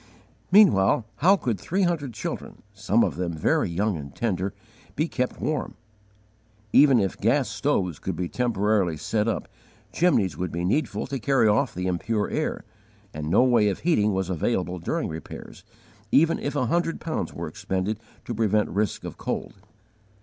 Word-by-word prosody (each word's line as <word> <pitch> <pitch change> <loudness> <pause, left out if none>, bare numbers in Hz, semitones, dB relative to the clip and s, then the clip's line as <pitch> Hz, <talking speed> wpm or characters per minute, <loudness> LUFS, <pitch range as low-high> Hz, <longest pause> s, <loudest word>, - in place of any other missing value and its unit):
Meanwhile 125 - +5
how 185 +7 +5
could 120 - -2
three 190 +3 0
hundred 165 -7 0
children, 100 - -6
some 105 +3 +2
of 80 -6 -1
them 90 -2 -2
very 80 - +1
young 100 +4 0
and 70 -2 -9
tender, 100 -4 -1 0.4
be 155 - 0
kept 125 -5 -2
warm? 155 -3 -2 1.0
Even 140 -4 +7
if 95 -2 -1
gas 130 +3 +2
stoves 105 - -1
could 95 - -3
be 90 +1 -2
temporarily 105 -7 +1
set 105 +8 -1
up, 115 - -2 0.5
chimneys 110 - +2
would 90 +2 -3
be 85 +1 -2
needful 145 +12 0
to 135 0 -4
carry 130 -2 +3
off 110 +6 +2
the 90 +1 -3
impure 105 +4 -1
air; 155 -5 -2 0.5
and 75 0 -4
no 100 +8 +5
way 120 -5 +4
of 100 - -4
heating 105 -12 +2
was 95 -2 -1
available 90 0 -1
during 85 - -2
repairs, 80 -1 -9 0.5
even 165 +2 +4
if 145 - -3
a 130 - +1
hundred 170 +6 0
pounds 160 - -3
were - - -5
expended 95 +3 -3 0.3
to 120 - -4
prevent 105 -1 +1
risk 105 0 -1
of - - -8
cold. - - -3
105 Hz, 165 wpm, -25 LUFS, 95-135 Hz, 1.0 s, Even